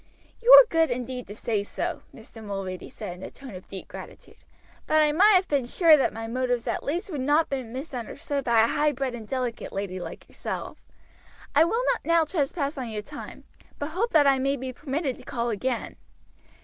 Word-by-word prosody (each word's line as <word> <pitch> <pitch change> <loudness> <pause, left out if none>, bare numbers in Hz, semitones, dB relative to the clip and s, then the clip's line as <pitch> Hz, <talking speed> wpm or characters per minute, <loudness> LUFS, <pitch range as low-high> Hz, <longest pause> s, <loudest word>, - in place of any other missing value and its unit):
"You 480 +2 +4
are - - +12
good 325 -3 +2
indeed 250 0 -4
to 205 - -8
say 215 -2 -1
so," - - -4
Mr. 225 - -13
Mulready 195 -3 -5
said 195 -5 -7
in - - -13
a - - -6
tone 265 -5 -11
of 185 0 -10
deep 190 -1 -8
gratitude; - - -11 0.5
"but 310 - +4
I 305 -1 +4
might 400 +7 +6
have 370 0 +3
been 275 -4 0
sure 325 +4 +6
that 275 - +2
my 225 0 -6
motives 245 0 -1
at - - -1
least 345 +7 -3
would 290 -5 -3
not 295 +4 +2
be 270 -1 -1
misunderstood 265 +3 -5
by 235 -3 +4
a - - +3
high 295 +4 +1
bred 270 -1 -2
and 225 -3 -8
delicate 250 -2 -3
lady 195 -2 -4
like - - -8
yourself. - - -6 0.7
I 310 +3 +6
will 460 +8 0
not 480 - -7
now 335 0 +4
trespass 290 -2 -2
on 250 -3 -4
your 210 -1 -4
time, 290 +5 -10 0.3
but 290 - -4
hope 390 +9 -1
that 305 -3 +6
I 275 -1 +4
may 275 +1 +1
be 260 0 -5
permitted 275 0 -3
to - - -14
call 235 -1 -2
again. 235 +3 -3
265 Hz, 210 wpm, -26 LUFS, 230-305 Hz, 0.7 s, are